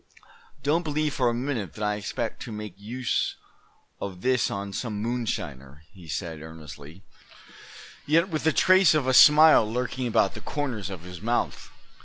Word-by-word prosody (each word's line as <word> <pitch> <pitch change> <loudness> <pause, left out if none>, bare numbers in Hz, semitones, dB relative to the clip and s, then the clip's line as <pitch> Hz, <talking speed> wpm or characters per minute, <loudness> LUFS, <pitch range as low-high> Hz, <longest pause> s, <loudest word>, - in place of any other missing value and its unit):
"Don't 150 +4 +2
believe 155 -2 -1
for 125 -2 +1
a - - -1
minute 120 -5 -3
that 110 - -6
I 105 0 +1
expect 105 +2 -4
to 120 - -7
make 105 -3 -6
use 115 +5 -2 0.6
of 95 -2 -6
this 130 0 +1
on 100 0 -5
some 110 -3 -4
moonshiner," 75 - -4
he 90 -4 -14
said, 80 +1 -5
earnestly, 80 +2 -11 1.0
yet 165 +5 +3
with 160 -2 -2
a - - +5
trace 185 -2 +5
of 150 -4 +1
a 130 - +1
smile 150 -6 +7
lurking 125 +1 -2
about 105 -4 +2
the - - -9
corners 130 -10 -4
of 95 -4 -7
his 90 -1 -10
mouth. 120 +2 -2
110 Hz, 165 wpm, -26 LUFS, 95-140 Hz, 1.0 s, smile